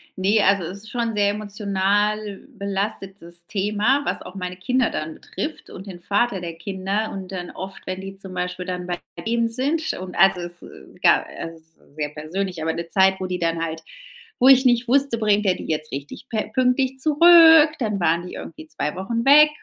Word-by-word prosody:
Ne, 200 +3 +2
also 195 -1 +3
es 180 +4 -6
ist 215 +1 -13
schon 235 -2 -1
'n 215 - -7
sehr 205 -1 +2
emotional 205 0 -1
belastetes 195 -3 -5
Thema, 210 +7 +1
was - - -2
auch 185 - -11
meine 180 -1 -5
Kinder 250 +5 +1
dann 155 +1 -4
betrifft 310 +1 -6
und 190 - -10
den 180 -2 -9
Vater 205 0 0
der 170 -2 -6
Kinder. 195 +4 -3
Und 195 -1 -7
dann 180 -2 -6
oft, 190 +1 -8
wenn 185 0 -5
die 195 0 -9
zum 190 -1 -10
Beispiel 180 0 -4
dann 180 -1 -5
bei 175 -1 -3 0.3
ihm 230 0 +1
sind 280 +8 -1
und 185 0 -8
also 190 -2 +4
es, 175 0 -7
äh, - - -10 0.3
egal - - +3
es 165 0 -7
ist 160 -2 -23
sehr 150 -1 -3
persönlich. 165 +4 -5
Aber 160 +1 -1
'ne 170 0 -5
Zeit, 190 +1 +4
wo 185 - -3
die 180 0 -3
dann 165 -1 -1
halt 160 0 -4 0.6
wo - - +7
ich 265 0 +7
nicht 240 0 +3
wusste, 270 -2 +3
bringt 210 -1 +2
er 185 - +4
die - - -8
jetzt 155 -1 -2
richtig 140 - -7
pe 215 -3 -3
pünktlich 260 +1 +1
zurück? 320 +2 +7
Dann 210 -4 -1
waren 170 0 +1
die - - -9
irgendwie 315 0 -9
2 165 - -4
Wochen 230 +5 -2
weg, 300 +2 +7
195 Hz, 205 wpm, -22 LUFS, 180-230 Hz, 0.6 s, wo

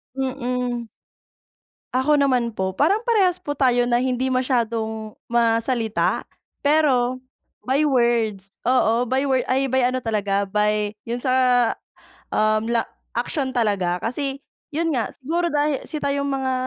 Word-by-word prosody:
Mm. 250 -3 -2 1.1
Ako 280 +4 +3
naman 250 -5 +1
po, 190 0 -2
parang 390 - +2
parehas 385 -7 +3
po 290 - -4
tayo 250 -3 +2
na 240 0 +2
hindi 255 0 0
masyadong 225 -4 -1 0.2
ma-salita. 230 -1 +1 0.4
Pero 260 -4 +2 0.4
by 270 +4 +2
words, 230 -7 +1 0.2
oo 245 -1 +3
by 260 +3 0
word, 260 -1 +2
ay 270 +1 +1
by 260 -1 +2
ano 255 0 -1
talaga, 205 -3 0
by 210 0 +1 0.2
'yun 240 +1 -3
sa, 255 0 +1 1.0
um, 215 +1 +2
la 235 -1 +1 0.3
action 260 +3 -1
talaga. 190 -6 0
Kasi 275 +3 -2 0.3
'yun 330 +1 0
nga, 235 -4 -1
siguro 335 +6 -1
dahil 295 -1 +1
si 305 - -4
tayong 280 0 0
mga 265 -1 -1
250 Hz, 135 wpm, -22 LUFS, 225-275 Hz, 1.1 s, Ako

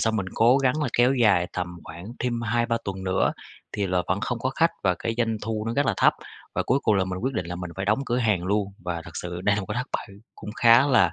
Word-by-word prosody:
xong 110 -1 +1
mình 95 - -2
cố 120 +4 +5
gắng 135 +3 +1
là 145 - 0
kéo 125 +3 +4
dài 100 -8 +3
tầm 90 -1 -2 0.2
khoảng 85 +3 -9
thêm 120 -2 -1
2-3 115 0 +1
tuần 95 -1 -5
nữa, 95 0 +1 0.4
thì 100 -1 -1
là 90 -1 +1
vẫn 95 +3 0
không 120 +1 -2
có 130 +3 -1
khách, 165 +4 +2
và 90 -2 +2
cái 115 - -2
doanh 115 -2 +1
thu 110 0 -3
nó 115 - -1
rất 145 0 +2
là 115 - +2
thấp, - - +5 0.4
và - - +1
cuối 130 - +2
cùng 110 - +3
là 95 -1 +2
mình 95 0 -4
quyết 130 +6 -2
định 90 -5 -2
là 90 - -5
mình 90 -1 -6
phải 95 - -2
đóng 105 +4 +2
cửa 120 - 0
hàng 105 -7 +1
luôn. 100 +1 0
Và 90 -1 -4
thật - - -10
sự 90 0 -5
đây 100 +2 +2
là - - 0
một 95 - -7
cái 105 - -4
thất 125 - -3
bại - - -3 0.3
cũng 105 - -8
khá 120 +3 +6
là, 130 -5 +4
110 Hz, 285 wpm, -25 LUFS, 95-120 Hz, 0.4 s, khá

